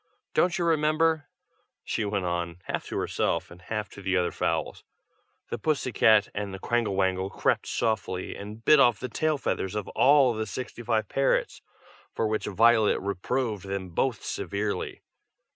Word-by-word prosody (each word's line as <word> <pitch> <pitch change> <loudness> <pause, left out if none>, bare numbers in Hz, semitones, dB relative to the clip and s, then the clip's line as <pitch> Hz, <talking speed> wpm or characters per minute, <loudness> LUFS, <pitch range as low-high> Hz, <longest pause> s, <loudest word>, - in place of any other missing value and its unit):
Don't 175 -1 +2
you 175 - 0
remember?" 155 -1 +2 0.6
she 115 - -2
went 100 -2 -1
on, 85 -1 -2
half - - -4
to - - -4
herself - - -1
and 90 +1 -13
half 105 +2 -3
to 100 - -11
the 95 -1 +1
other 90 -1 +1
fowls, - - -2 0.7
"the 120 - -3
Pussy 135 0 0
Cat 110 -3 +5
and 100 -1 -3
the 95 - -6
Quangle 115 0 0
Wangle 95 0 +1
crept - - 0
softly, 110 -5 -2
and 105 +3 -9
bit 150 -1 +7
off 120 -5 +5
the 130 - -4
tail 155 +5 0
feathers 95 -7 -2
of 105 - -3
all 135 -3 +5
the 110 0 -3
sixty 120 +4 -6
five 110 -2 0
parrots; 135 0 0 0.5
for - - 0
which 110 0 -1
Violet 110 +1 +4
reproved 100 +2 -2
them 95 -1 -4
both 115 +6 -1
severely. 100 +2 -3
110 Hz, 165 wpm, -27 LUFS, 95-130 Hz, 0.7 s, bit